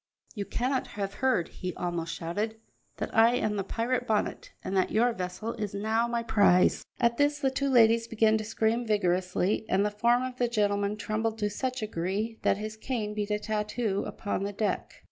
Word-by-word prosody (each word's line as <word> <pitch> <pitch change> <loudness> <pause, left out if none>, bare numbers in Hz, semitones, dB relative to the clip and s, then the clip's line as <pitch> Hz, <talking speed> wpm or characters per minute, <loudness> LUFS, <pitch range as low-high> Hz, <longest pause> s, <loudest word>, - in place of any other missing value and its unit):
"You 205 -3 -4
cannot 255 +5 -1
have 200 -1 -2
heard," 255 -11 +2
he 180 -1 -6
almost 170 -1 -3
shouted, 210 +7 -3 0.4
"that - - -4
I 225 +2 +6
am 215 -4 0
the 200 - -1
pirate 240 +5 -1
Bonnet, 215 -2 -1
and 195 - -3
that 185 - +2
your 235 +2 +2
vessel 185 +4 -4
is 210 -3 -4
now 220 +3 +1
my 235 0 -1
prize." 200 -5 +4 0.2
At 235 -1 +2
this 290 0 +3
the 270 -2 0
two 275 +1 0
ladies 230 -2 +5
began 220 -1 +3
to - - -3
scream 225 +2 0
vigorously, 185 -1 +1
and 195 +2 +3
the 210 - 0
form 235 +4 +2
of 255 -1 -5
the 245 - +2
gentleman 205 -2 0
trembled 220 +1 -2
to 210 -1 -1
such 255 +2 -3
a - - +1
degree 210 +4 -3
that - - +2
his 215 +1 -6
cane 220 -3 -3
beat 210 -1 -3
a 210 - +1
tattoo 210 -1 -1
upon 205 - -3
the 200 +1 -3
deck. 210 +1 -1
215 Hz, 200 wpm, -28 LUFS, 200-235 Hz, 0.4 s, I